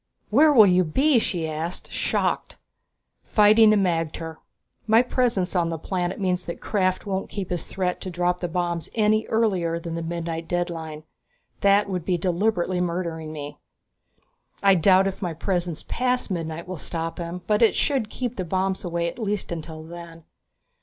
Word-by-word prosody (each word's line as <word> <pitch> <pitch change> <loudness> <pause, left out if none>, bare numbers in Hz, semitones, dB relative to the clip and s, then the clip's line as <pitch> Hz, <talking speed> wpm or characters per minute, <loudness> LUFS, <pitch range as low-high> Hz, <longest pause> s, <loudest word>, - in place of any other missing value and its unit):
"Where 300 +7 +6
will 230 -7 +8
you 185 -1 +4
be?" 265 - +3
she 170 -6 -2
asked, 160 +3 -5
shocked. - - -1 0.7
"Fighting 215 +1 +6
the 215 - +5
magter. 165 -4 -1 0.5
My 225 +2 +6
presence 235 -8 0
on 170 -2 +2
the 165 - -3
planet 180 +3 -3
means 180 -2 0
that 170 - -6
Krafft 185 -2 0
won't 195 -1 -3
keep 195 -3 -5
his 175 -2 -2
threat 180 -2 -2
to 185 - -5
drop 180 0 0
the 175 - -2
bombs 170 -1 -2
any 215 0 +2
earlier 185 -7 +1
than 170 0 -6
the 165 - -3
midnight 165 0 -4
deadline. 165 -3 -3 0.6
That 200 +1 +4
would 185 -3 -3
be 180 +1 0
deliberately 180 +1 0
murdering 170 -3 -3
me. 145 -1 -7 1.0
I 195 -1 +7
doubt 190 +2 +5
if 195 -1 -3
my 175 -4 -3
presence 175 -2 -2
past 250 -3 -1
midnight 165 -1 -4
will 185 -1 -5
stop 165 +2 -5
him, 170 +1 -5
but 210 +3 +1
it 230 - +5
should 265 -7 0
keep 245 +1 -4
the 185 - -1
bombs 190 +2 -1
away 170 -1 -1
at 170 - -6
least 210 -4 -2
until 160 -1 -6
then." 165 0 -10
180 Hz, 170 wpm, -24 LUFS, 165-200 Hz, 1.0 s, will